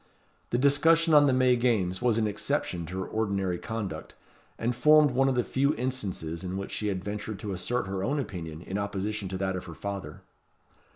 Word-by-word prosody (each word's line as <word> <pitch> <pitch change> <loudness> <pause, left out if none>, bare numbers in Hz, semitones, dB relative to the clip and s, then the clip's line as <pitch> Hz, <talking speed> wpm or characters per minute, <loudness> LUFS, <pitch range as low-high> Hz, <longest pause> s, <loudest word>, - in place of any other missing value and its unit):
The 120 - +1
discussion 160 +5 +4
on 145 -1 +7
the - - +4
May 130 -1 +4
Games 110 -7 +1
was 120 -3 +2
an 110 - +2
exception 90 -4 -2
to 95 +2 -4
her - - -3
ordinary 100 -5 -1
conduct, 110 -4 -5 0.4
and 120 +2 -1
formed 150 +3 +6
one 135 +2 +3
of 130 - 0
the 125 - +2
few 140 +5 +1
instances 95 -10 -3
in 95 +1 -3
which 100 - -5
she 105 - -2
had 95 -3 -2
ventured 105 +1 -4
to 100 0 -5
assert 120 +7 -1
her 95 -1 -3
own 140 +9 0
opinion 85 - -6
in 95 +2 -3
opposition 100 0 -3
to 95 0 -4
that 95 0 -1
of 90 - -5
her 85 -3 -9
father. 100 -1 -6
105 Hz, 205 wpm, -28 LUFS, 95-125 Hz, 0.4 s, on